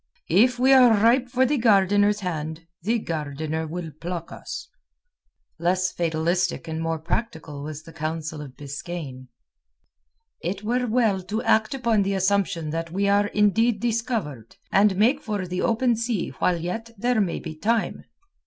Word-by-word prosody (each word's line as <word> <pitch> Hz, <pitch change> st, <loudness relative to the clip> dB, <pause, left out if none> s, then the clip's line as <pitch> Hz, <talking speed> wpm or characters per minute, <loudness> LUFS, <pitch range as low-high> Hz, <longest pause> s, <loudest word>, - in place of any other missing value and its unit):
"If 245 Hz, +8 st, +4 dB
we 260 Hz, +2 st, +5 dB
are 255 Hz, -3 st, +7 dB
ripe 245 Hz, +4 st, +3 dB
for 255 Hz, +1 st, +2 dB
the 285 Hz, +1 st, +1 dB
gardeners 205 Hz, -1 st, +4 dB
hand, 160 Hz, -2 st, -4 dB, 0.2 s
the 225 Hz, +7 st, +1 dB
gardener 160 Hz, -3 st, -3 dB
will 165 Hz, 0 st, -5 dB
pluck 170 Hz, -1 st, -5 dB
us." -, -, -7 dB, 0.9 s
Less 185 Hz, +2 st, +1 dB
fatalistic 170 Hz, +2 st, -1 dB
and 160 Hz, 0 st, -3 dB
more 165 Hz, 0 st, -1 dB
practical 160 Hz, -4 st, -4 dB
was 155 Hz, +1 st, -7 dB
the 165 Hz, -, -13 dB
counsel 155 Hz, 0 st, -4 dB
of 135 Hz, -3 st, -10 dB
Biskaine. 145 Hz, -2 st, -7 dB, 1.1 s
"It 190 Hz, +4 st, -3 dB
were 245 Hz, +3 st, 0 dB
well 220 Hz, -5 st, +2 dB
to 210 Hz, +5 st, -3 dB
act 220 Hz, +4 st, +2 dB
upon 235 Hz, -5 st, +2 dB
the 195 Hz, 0 st, 0 dB
assumption 190 Hz, -5 st, 0 dB
that 165 Hz, +1 st, -3 dB
we 200 Hz, +3 st, 0 dB
are 205 Hz, +1 st, +3 dB
indeed 210 Hz, +2 st, +2 dB
discovered, 220 Hz, -, -2 dB, 0.2 s
and 200 Hz, 0 st, +4 dB
make 240 Hz, +9 st, +3 dB
for 210 Hz, -7 st, -3 dB
the 180 Hz, 0 st, -3 dB
open 235 Hz, +1 st, +2 dB
sea 230 Hz, -4 st, -2 dB
while 180 Hz, -1 st, +2 dB
yet 180 Hz, +8 st, -4 dB
there 240 Hz, +1 st, +1 dB
may 185 Hz, -4 st, -1 dB
be 160 Hz, -2 st, -7 dB
time." 220 Hz, +8 st, -1 dB
190 Hz, 155 wpm, -24 LUFS, 160-225 Hz, 1.1 s, are